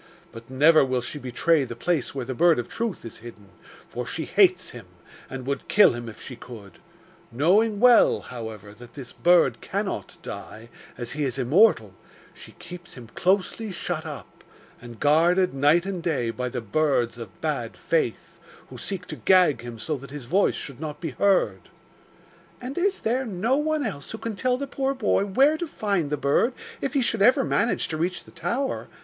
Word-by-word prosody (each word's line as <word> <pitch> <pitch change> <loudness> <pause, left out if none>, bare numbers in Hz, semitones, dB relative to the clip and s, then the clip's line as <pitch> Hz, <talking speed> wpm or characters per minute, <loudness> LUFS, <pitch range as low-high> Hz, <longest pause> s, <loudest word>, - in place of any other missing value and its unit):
But 115 0 -12
never 150 +4 +5
will 130 -2 0
she 145 +5 -5
betray 140 +4 +1
the 120 -3 -6
place 150 +2 -1
where 130 -3 -3
the 130 - -4
Bird 170 +4 +4
of 120 - -3
Truth 230 - -4
is 115 - -8
hidden, 110 -4 -13 0.4
for 125 - -5
she 160 +5 -4
hates 185 -3 +3
him, 115 -6 -11 0.4
and 130 -1 -7
would 140 +1 -3
kill 210 -9 +6
him 120 -1 -6
if 110 - -12
she 125 - -8
could; 110 -6 -12 0.5
knowing 200 - +2
well, 245 0 +5
however, 110 -4 -8
that 120 +2 -15
this 135 -4 -9
bird 170 -8 +3
cannot - - -4
die, 115 +2 -9 0.3
as 120 -1 -5
he 150 +3 -2
is 135 -2 -2
immortal, 130 - +3 0.4
she - - -13
keeps 175 -1 -11
him 120 -4 -11
closely 195 - 0
shut 175 -3 -3
up, 145 - -10 0.4
and 120 -2 -11
guarded 175 +5 +3
night 145 +6 +3
and 190 -3 -4
day 135 -9 -1
by 125 +2 -4
the 125 0 -4
Birds 120 0 0
of 105 -6 -10
Bad - - -3
Faith, - - -2 0.3
who - - -10
seek 190 -2 -4
to - - -7
gag 180 -10 +4
him 120 -1 -8
so 155 +7 -3
that 140 +1 -11
his 145 -2 -7
voice 190 +11 +2
should 140 -3 -6
not 150 -1 -6
be 165 -4 -4
heard.' 125 - +1 0.9
'And 255 +3 -6
is 390 +2 0
there 250 +3 0
no 215 +6 0
one 305 0 0
else 140 -1 -5
who 220 - -6
can 225 -1 -5
tell 250 +4 0
the 280 - -3
poor 275 0 -2
boy 215 -5 +1
where 270 +10 +3
to 345 - -3
find 200 - -1
the 150 - -1
bird, 145 - +1 0.3
if 275 - -3
he 270 - +3
should 225 -3 -1
ever 255 +6 +5
manage 230 -1 0
to 155 - -3
reach 175 +3 -2
the - - -16
tower? 185 - -3
155 Hz, 190 wpm, -25 LUFS, 125-200 Hz, 0.9 s, kill